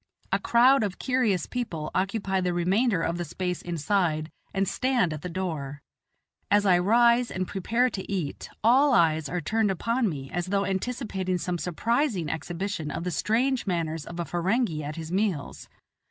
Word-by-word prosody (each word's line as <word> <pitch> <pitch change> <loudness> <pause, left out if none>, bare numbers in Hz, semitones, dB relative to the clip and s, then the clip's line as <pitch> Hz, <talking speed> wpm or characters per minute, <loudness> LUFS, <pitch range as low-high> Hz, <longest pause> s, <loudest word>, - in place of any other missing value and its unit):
A - - +2
crowd 250 +3 +5
of 200 -3 -3
curious 245 - +1
people 175 -12 -4
occupy 195 0 0
the 180 -1 0
remainder 185 +2 +2
of 170 +1 -1
the - - -1
space 180 +2 -3
inside, 170 -2 0 0.2
and 195 0 0
stand 245 -10 +1
at 155 - -6
the 180 - -5
door. 155 -6 -4 0.7
As 205 0 +4
I 180 -3 +5
rise 235 +5 +4
and 185 -1 -3
prepare 230 +6 +1
to 195 -1 -6
eat, 175 -8 -3
all 260 +4 +5
eyes 160 -6 +3
are 180 +2 -2
turned 220 +6 +1
upon 230 +5 0
me 135 -5 -6
as 175 0 -2
though 200 +1 +1
anticipating 190 -2 -2
some 175 +1 -3
surprising 210 - 0
exhibition 170 +1 -4
of 165 - -4
the 180 - -2
strange 240 - +1
manners 165 -3 -2
of 170 +1 -7
a 170 - -1
Ferenghi 175 -1 0
at 145 +1 -5
his 160 0 -6
meals. 190 -6 -2
185 Hz, 170 wpm, -27 LUFS, 170-225 Hz, 0.7 s, crowd